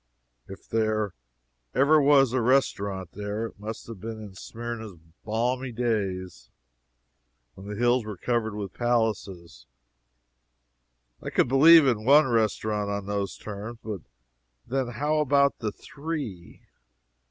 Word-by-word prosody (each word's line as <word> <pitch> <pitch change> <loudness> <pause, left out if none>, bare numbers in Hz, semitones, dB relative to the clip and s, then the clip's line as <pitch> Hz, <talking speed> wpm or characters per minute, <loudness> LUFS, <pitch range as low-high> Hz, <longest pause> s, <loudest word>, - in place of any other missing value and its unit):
If 95 - -11
there 110 -2 0 0.6
ever 145 +4 +5
was 140 -3 +5
a 130 - +2
restaurant 100 -7 +1
there, 105 +2 -4
it 110 - -10
must 110 +2 -7
have 115 -4 -9
been 110 0 -6
in 105 -3 -9
Smyrna's 115 0 -7 0.3
palmy 125 +4 -1
days, 95 - -2 1.0
when 95 +7 -12
the 105 - -5
hills 120 +2 +2
were 105 -2 -7
covered 115 -2 -1
with 100 -3 -5
palaces. 100 - -2 1.5
I - - -5
could - - +2
believe 155 +5 +8
in 115 -5 +1
one 145 +5 +6
restaurant, 110 -3 0
on 100 -1 -3
those 100 -1 -3
terms; 105 +3 -7
but 105 -5 -5 0.6
then 130 0 -1
how 145 +6 0
about 140 -1 +3
the 110 -3 -2
three? 145 - -7
110 Hz, 130 wpm, -26 LUFS, 100-130 Hz, 1.5 s, believe